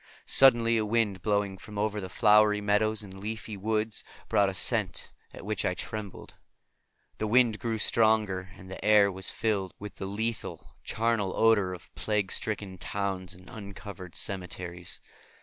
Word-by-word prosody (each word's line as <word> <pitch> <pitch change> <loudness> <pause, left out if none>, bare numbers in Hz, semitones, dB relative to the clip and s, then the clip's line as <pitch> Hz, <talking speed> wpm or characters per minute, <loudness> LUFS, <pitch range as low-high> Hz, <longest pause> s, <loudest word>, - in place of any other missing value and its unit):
Suddenly 115 -3 +6
a 110 - +1
wind 105 -3 0
blowing 100 -2 0
from 105 0 -10
over 105 0 -1
the 95 - -6
flowery 105 +1 +5
meadows 105 +1 +1
and 95 -1 -11
leafy 110 +1 -5
woods 110 +2 -1 0.3
brought 100 -1 +3
a - - -4
scent - - 0 0.2
at - - -11
which - - -1
I - - 0
trembled. 105 -3 -6 0.9
The 110 - -1
wind 115 -1 +4
grew 115 -2 -2
stronger, 105 -4 +2
and 95 - -12
the 95 0 -8
air 105 -1 +5
was 95 0 -1
filled 100 -5 -1
with 105 0 -9
the 95 - -4
lethal, 110 +3 -4
charnel 115 -4 0
odor 110 -4 +4
of 85 - -16
plague 105 -3 -1
stricken 105 -6 -2
towns 95 -2 -3
and 90 0 -16
uncovered 100 -4 -9
cemeteries. 90 -2 -3
105 Hz, 155 wpm, -29 LUFS, 95-110 Hz, 0.9 s, Suddenly